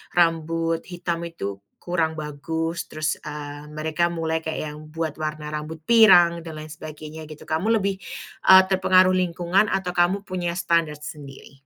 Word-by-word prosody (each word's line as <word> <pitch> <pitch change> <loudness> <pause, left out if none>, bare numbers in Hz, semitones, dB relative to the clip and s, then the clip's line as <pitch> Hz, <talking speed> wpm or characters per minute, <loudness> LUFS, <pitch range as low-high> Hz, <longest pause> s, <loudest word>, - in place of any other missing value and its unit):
rambut 165 -1 +1
hitam 170 -1 -3
itu 100 -12 -6 0.2
kurang 165 -3 -1
bagus 160 +3 -3
terus, 155 0 -1
eee, 145 0 -7
mereka 155 +3 0
mulai 160 -1 -1
kayak 160 - -3
yang 150 - -10
buat 160 -2 -3
warna 155 -1 -4
rambut 155 +1 -5
pirang 175 -7 +6
dan 160 -2 -8
lain 155 - -8
sebagainya 155 0 -9
gitu 155 -1 -11
kamu 170 +8 0
lebih, 195 0 -1 0.5
eee, 190 0 +10
terpengaruh 185 -1 +4
lingkungan 180 +3 +1
atau 185 -2 -1
kamu 180 +3 +2
punya 175 -2 -2
standard 165 -3 +1
sendiri? 140 -2 -10
165 Hz, 150 wpm, -24 LUFS, 155-175 Hz, 0.5 s, eee